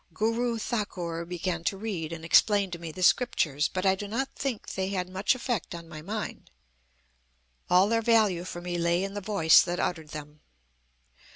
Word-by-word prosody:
Guru 230 Hz, +3 st, 0 dB
Thakur 180 Hz, -7 st, -3 dB
began 175 Hz, -1 st, -3 dB
to 195 Hz, -, 0 dB
read 190 Hz, -7 st, -4 dB
and 165 Hz, -1 st, -7 dB
explain 200 Hz, +3 st, +4 dB
to 170 Hz, -, -5 dB
me 165 Hz, -1 st, -6 dB
the 185 Hz, +4 st, -5 dB
scriptures. 155 Hz, -, +2 dB
But 185 Hz, +1 st, -3 dB
I 190 Hz, -, +5 dB
do 200 Hz, +2 st, -5 dB
not 260 Hz, +6 st, -2 dB
think 265 Hz, -6 st, -3 dB
they 190 Hz, 0 st, -2 dB
had 185 Hz, -2 st, -2 dB
much 190 Hz, +6 st, +1 dB
effect 240 Hz, -8 st, -3 dB
on 170 Hz, -1 st, -9 dB
my 155 Hz, -1 st, -9 dB
mind. 210 Hz, +6 st, -5 dB, 1.2 s
All 180 Hz, +2 st, +5 dB
their 230 Hz, +1 st, +1 dB
value 215 Hz, -6 st, +3 dB
for 175 Hz, -1 st, -7 dB
me 175 Hz, 0 st, -3 dB
lay 170 Hz, +2 st, +1 dB
in 195 Hz, 0 st, -4 dB
the 205 Hz, -, -4 dB
voice 190 Hz, -6 st, +5 dB
that 175 Hz, 0 st, -2 dB
uttered 160 Hz, -3 st, -2 dB
them. 150 Hz, 0 st, -9 dB
185 Hz, 185 wpm, -28 LUFS, 170-210 Hz, 1.2 s, I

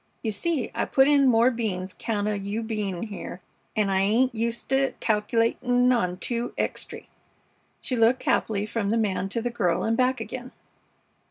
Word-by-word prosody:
You 220 Hz, -, 0 dB
see, 275 Hz, +5 st, -1 dB
I -, -, -1 dB
put 265 Hz, 0 st, +4 dB
in 285 Hz, -2 st, +5 dB
more 240 Hz, +1 st, +5 dB
beans 195 Hz, -6 st, -3 dB
'count 210 Hz, -2 st, -2 dB
o' 210 Hz, -, +1 dB
you 200 Hz, +3 st, -3 dB
bein' 210 Hz, -5 st, -3 dB
here, 200 Hz, -4 st, -7 dB, 0.4 s
an' 210 Hz, -3 st, +1 dB
I 190 Hz, -, +2 dB
ain't 230 Hz, +6 st, +2 dB
uset 230 Hz, +1 st, -2 dB
to 270 Hz, 0 st, +2 dB
calca'latin' 235 Hz, +3 st, +2 dB
on 180 Hz, -7 st, 0 dB
two 235 Hz, +4 st, -3 dB
extry." -, -, -3 dB, 0.7 s
She 255 Hz, -, -2 dB
looked 235 Hz, +2 st, +3 dB
happily 210 Hz, -2 st, +1 dB
from 215 Hz, -1 st, -2 dB
the 225 Hz, -, +2 dB
man 195 Hz, -3 st, 0 dB
to 230 Hz, +3 st, -2 dB
the 245 Hz, -, -1 dB
girl 180 Hz, -7 st, 0 dB
and 225 Hz, +1 st, +1 dB
back 255 Hz, +1 st, +2 dB
again. 250 Hz, +2 st, -7 dB
225 Hz, 175 wpm, -25 LUFS, 205-245 Hz, 0.7 s, in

